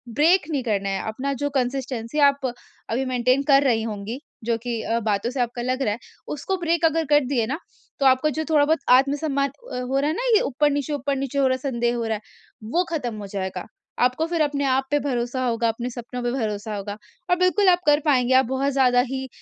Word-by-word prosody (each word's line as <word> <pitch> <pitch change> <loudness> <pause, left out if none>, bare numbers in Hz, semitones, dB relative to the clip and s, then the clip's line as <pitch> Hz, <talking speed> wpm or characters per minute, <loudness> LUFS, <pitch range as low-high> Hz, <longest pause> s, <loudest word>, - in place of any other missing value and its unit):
Break 340 +5 +5
नहीं 280 -4 0
करना 200 -4 -1
है, 195 0 -1
अपना 260 +6 -3
जो 285 +2 -2
कंसिस्टेंसी 255 0 -2
आप 280 -1 0 0.4
अभी 255 +4 -1
मेंटेन 255 +2 +1
कर 275 0 +6
रही 235 -5 +2
होंगी, 220 +3 -5 0.2
जो 230 0 0
कि 230 -1 -4
अ, 230 +1 -1
बातों 215 0 -1
से 260 - -5
आपका 240 0 -2
लग 255 +2 -1
रहा 210 -5 +1
है, 230 - -7 0.3
उसको 370 +6 -3
ब्रेक 335 -1 +1
अगर 325 0 +2
कर 295 -2 +4
दिए 245 -4 0
ना, 275 +5 -2 0.4
तो 275 - +1
आपका 260 +3 +4
जो 315 - -1
थोड़ा 295 -2 +4
बहुत 315 +1 +2
आत्मसम्मान 275 +2 +3 0.2
अ, - - -2
हो 265 +2 0
रहा 290 - +1
है 315 - -1
ना - - -3
ये 425 - +5
ऊपर-नीचे 290 - 0
ऊपर-नीचे 275 -1 -2
हो 270 - +4
रहा 260 - +2
है 275 - +1
संदेह 240 0 0
हो 235 - -2
रहा 225 -1 0
है, 210 - -7 0.4
वो 335 +12 0
खत्म 250 -9 -2
हो 205 -1 -7
जाएगा। 190 -2 -4 0.3
आपको 250 +6 +2
फिर 335 -1 -1
अपने 285 -2 0
आप 265 0 +2
पे 290 - +3
भरोसा 255 -1 -2
होगा, 235 -1 +1
अपने 235 +2 -3
सपनों 245 0 -7
पे 240 - 0
भरोसा 215 -4 -3
होगा। 205 +1 -5 0.3
और 360 - +5
बिल्कुल 365 +2 +3
आप 355 - +4
कर 295 0 +5
पाएँगे 260 -3 +3
आप 260 - +5
बहुत 265 +3 0
ज़्यादा 250 -2 +4
ही 265 0 -4
260 Hz, 230 wpm, -23 LUFS, 235-285 Hz, 0.4 s, कर